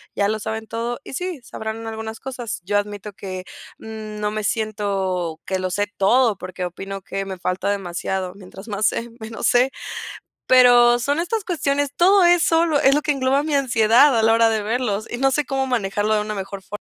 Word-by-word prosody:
ya 200 - +2
lo 215 +1 0
saben 220 +1 -5
todo 235 +2 -3
y - - -9
sí, 360 0 -4
sabrán 225 -1 -6
algunas 220 0 -6
cosas. 250 -5 -5
Yo 205 +1 +1
admito 205 0 -4
que, 185 -1 -7 0.3
mm, 215 -1 -8
no 210 0 -1
me 215 0 -3
siento 195 -6 -2
que 190 - -1
lo 185 -1 -2
sé 205 +2 0
todo, 225 +1 +3
porque 185 0 -5
opino 195 +2 -6
que 195 +1 -4
me 190 -1 -6
falta 185 +2 -1
demasiado, 185 -1 -3
mientras 195 +2 -12
más 210 0 -1
sé, 235 +1 -2
menos 220 0 -3
sé. 250 +2 +4 0.8
Pero 245 -1 +7
son 285 +6 0
estas 400 +5 -1
cuestiones, 285 -6 -1
todo 380 +2 +5
eso 340 -1 +4
lo, 305 -4 +2
es 275 +1 +4
lo 300 - +2
que 300 - 0
engloba 270 +1 +1
mi 305 -1 -2
ansiedad 245 0 +4
a 220 - +2
la 225 - +5
hora 230 0 +5
de 215 -2 0
verlos, 220 -2 -1
y 240 - -3
no 270 +1 +2
sé 295 +2 +1
cómo 270 -1 -1
manejarlo 210 -3 0
de 210 - +1
una 210 0 -4
mejor 195 0 -6
fo 210 - -7
220 Hz, 205 wpm, -21 LUFS, 200-260 Hz, 0.8 s, Pero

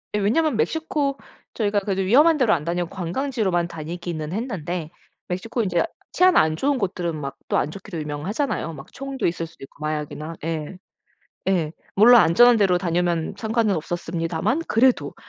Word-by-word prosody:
예. - - +1
왜냐하면 240 +7 +2
멕시코 295 0 0 0.4
저희가 205 -2 +1
그래도 195 -1 -2
위험한 295 - +5
데로 235 -6 +3
안 155 - 0
다니고 175 0 -1
관광지로만 190 -1 -1
다니기는 165 -1 -5
했는데 180 - -3 0.4
멕시코 225 +7 -2
인제 175 -4 +1 0.3
치안 365 0 +5
안 155 0 +4
좋은 280 - +1
곳들은 180 -6 -2
막 140 -1 -5
또 - - +2
안 150 - 0
좋기로 190 -2 -7
유명하잖아요. 165 - -3
막 135 -3 -11
총도 275 0 -4
있을 170 -1 -2
수도 160 - -16
있고 135 - -13
마약이나 155 +1 -4
예. 165 +2 -4 0.7
예. 170 -5 +1 0.2
물론 235 +4 +8
안전한 240 +8 +6
데로 190 -4 +3
다니면 175 0 0
상관은 220 -1 +1
없었습니다만 165 - -2
그래도 250 +3 +2
180 Hz, 380 characters per minute, -23 LUFS, 165-235 Hz, 0.7 s, 물론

